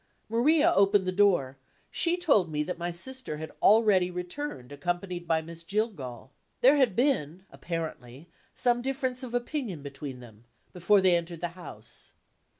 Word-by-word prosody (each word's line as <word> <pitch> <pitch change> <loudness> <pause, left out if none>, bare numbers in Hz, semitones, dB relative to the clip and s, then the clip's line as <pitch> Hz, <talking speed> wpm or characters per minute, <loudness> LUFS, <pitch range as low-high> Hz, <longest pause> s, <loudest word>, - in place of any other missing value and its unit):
Maria 290 +8 +4
opened 200 0 +4
the 185 - 0
door; 175 -9 +2 0.3
she 340 +1 +1
told 245 - +2
me 150 0 0
that 175 +2 -5
my 175 +1 -2
sister 210 0 -5
had 160 +1 -7
already 205 -4 +5
returned, 180 - -6
accompanied 175 +4 -3
by 160 -1 +1
Miss 165 +1 -9
Jillgall. 165 - -3 0.3
There 265 +4 +7
had 250 -9 +3
been 190 - 0
apparently 155 -4 -6 0.2
some 240 -1 +1
difference 260 -1 -2
of 245 -2 -5
opinion 240 - -3
between 140 -2 -7
them, 115 -2 -15 0.3
before 185 +3 +3
they 185 -2 +5
entered 170 -1 -3
the 175 - -1
house. 120 - -10
180 Hz, 150 wpm, -28 LUFS, 155-235 Hz, 0.3 s, There